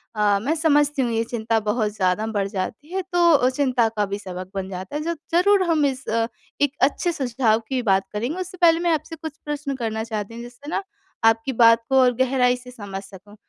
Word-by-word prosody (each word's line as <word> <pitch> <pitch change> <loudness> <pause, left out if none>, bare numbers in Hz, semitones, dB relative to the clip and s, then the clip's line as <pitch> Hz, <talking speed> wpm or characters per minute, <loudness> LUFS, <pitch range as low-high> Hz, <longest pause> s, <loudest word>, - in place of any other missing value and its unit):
अ, 205 -1 +3
मैं 280 +9 0
समझती 295 -3 +2
हूँ 240 -2 0
ये 225 0 +1
चिंता 225 -1 -1
बहुत 210 0 -1
ज़्यादा 185 +2 +1
बढ़ 200 -3 -1
जाती 215 - -5
है 380 - 0
तो 335 -7 +5
चिंता 255 -3 +1
का 205 - +2
भी 200 +1 -4
सबक 185 -2 -7
बन 190 0 -3
जाता 190 +8 -7
है 300 - -1
जो 335 +1 -1 0.2
ज़रूर 385 +2 +4
हम 305 -3 +3
इस 270 -1 -2
अ, 225 0 +1 0.4
एक 285 -2 +3
अच्छे 290 +6 +2
सुझाव 245 -6 +1
की 260 -2 0
बात 195 -3 +2
करेंगे। 240 - -2
उससे 370 0 -6
पहले 330 -1 +6
मैं 345 -1 +1
आपसे 315 +2 -3
कुछ 315 -1 -8
प्रश्न 295 -2 -3
करना 220 -3 -3
चाहती 220 -1 -5
हूँ 235 - -7
जिससे 245 +5 -11
ना - - -1 0.4
आपकी 225 +4 +3
बात 230 0 +6
को 265 - +2
और 250 -1 +4
गहराई 250 -1 +2
से 250 0 -12
समझ 200 -5 -7
सकूँ। 200 +1 -14
245 Hz, 220 wpm, -23 LUFS, 210-290 Hz, 0.4 s, पहले